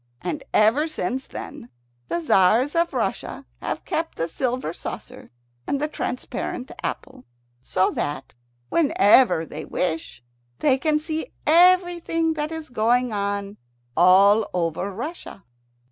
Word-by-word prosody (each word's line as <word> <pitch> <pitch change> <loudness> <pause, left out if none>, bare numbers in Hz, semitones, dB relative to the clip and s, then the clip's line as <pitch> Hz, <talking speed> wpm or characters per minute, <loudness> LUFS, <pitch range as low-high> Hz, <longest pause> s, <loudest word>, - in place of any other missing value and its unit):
And 180 - -3
ever 230 +9 +3
since 265 - -3
then 120 - -8 0.4
the 340 - -2
Tzars 240 - +3
of 335 0 +2
Russia - - -3 0.2
have - - -4
kept 325 +1 -2
the 165 - -1
silver 245 - -2
saucer - - -8 0.4
and 280 - 0
the 300 - 0
transparent 255 -2 -4
apple, 260 -1 -5 0.4
so 185 +8 +1
that, 145 -2 -4 0.4
whenever 245 - +4
they - - -7
wish, 160 -7 -3 0.3
they 265 -3 +2
can 305 +1 +2
see 315 +7 -4
everything 345 -1 +4
that 305 0 -3
is 320 -2 -6
going 245 +1 +1
on 200 0 -2 0.4
all 195 +5 +5
over 170 +3 -1
Russia. 240 - -7
250 Hz, 125 wpm, -23 LUFS, 195-310 Hz, 0.4 s, all